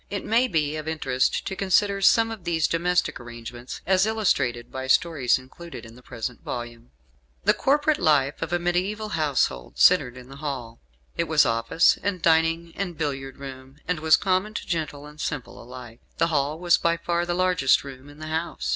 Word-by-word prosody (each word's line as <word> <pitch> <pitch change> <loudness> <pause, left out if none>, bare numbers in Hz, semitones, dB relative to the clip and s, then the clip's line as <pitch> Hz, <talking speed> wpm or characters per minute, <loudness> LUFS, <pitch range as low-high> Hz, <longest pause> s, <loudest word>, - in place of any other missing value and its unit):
It 200 -1 -4
may 235 +3 +3
be 155 -6 0
of 155 0 -6
interest 135 -5 0
to 190 - -4
consider 195 +1 +2
some 225 +3 +4
of 220 -5 -8
these 165 -2 +1
domestic 175 +2 0
arrangements, 120 +1 -9
as 190 +2 +3
illustrated 135 - 0
by 130 0 -5
stories 145 -3 +3
included 130 +4 -11
in 115 - -12
the 125 - -15
present 125 -1 -6
volume. 120 -1 -6 0.5
The - - +4
corporate 295 +2 +2
life 145 -3 +2
of 165 - -3
a 175 - +2
mediaeval 185 +5 -1
household 145 - -1
centered 125 +1 +4
in 125 0 -11
the 135 +1 -12
hall. 135 -6 -5 0.4
It - - +1
was - - +4
office 115 +8 +2
and 200 -2 -2
dining 165 0 +2
and 180 -4 -4
billiard 135 -3 -4
room, 135 -1 -10
and 180 -2 -1
was 155 0 +5
common 195 +2 0
to - - -4
gentle 155 -4 -3
and 150 +1 -11
simple 150 -5 -5
alike. 120 -1 -11 0.2
The - - +2
hall 145 +1 0
was 175 0 +3
by 170 0 +1
far 170 0 -1
the 175 - -1
largest 180 -7 +3
room 135 0 -11
in 145 - -14
the 155 - -8
house. 160 +2 -3
155 Hz, 190 wpm, -25 LUFS, 130-180 Hz, 0.5 s, was